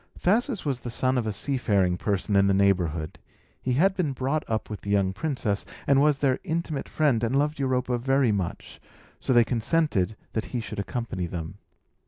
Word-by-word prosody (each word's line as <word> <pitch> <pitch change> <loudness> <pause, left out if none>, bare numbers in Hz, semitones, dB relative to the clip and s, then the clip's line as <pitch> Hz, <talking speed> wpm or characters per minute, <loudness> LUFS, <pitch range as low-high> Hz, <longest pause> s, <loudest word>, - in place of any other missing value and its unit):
Thasus 220 - +1
was 135 -4 -1
the 125 - -6
son 130 +2 0
of 120 -3 0
a - - 0
seafaring 100 -6 +1
person 100 +2 -1
in 100 0 +5
the 100 - +3
neighbourhood; 90 -5 +1 0.4
he 130 - 0
had 190 +9 +3
been 165 -8 0
brought 135 +4 -1
up 110 -1 -1
with 105 - -7
the 100 - -7
young 100 -2 +2
princess, 105 -4 -1 0.2
and 140 -1 +4
was 150 -1 +4
their 135 -2 +1
intimate 165 -5 -3
friend, 140 -7 +2
and 120 +4 +1
loved 150 +1 0
Europa 125 -2 0
very 135 -1 +2
much; 95 -4 -4 0.4
so - - -2
they 120 -2 +6
consented 115 - +1 0.2
that 110 - -1
he 125 - -3
should 110 - -6
accompany 100 -3 -3
them. 85 +3 -6
120 Hz, 190 wpm, -26 LUFS, 100-140 Hz, 0.4 s, they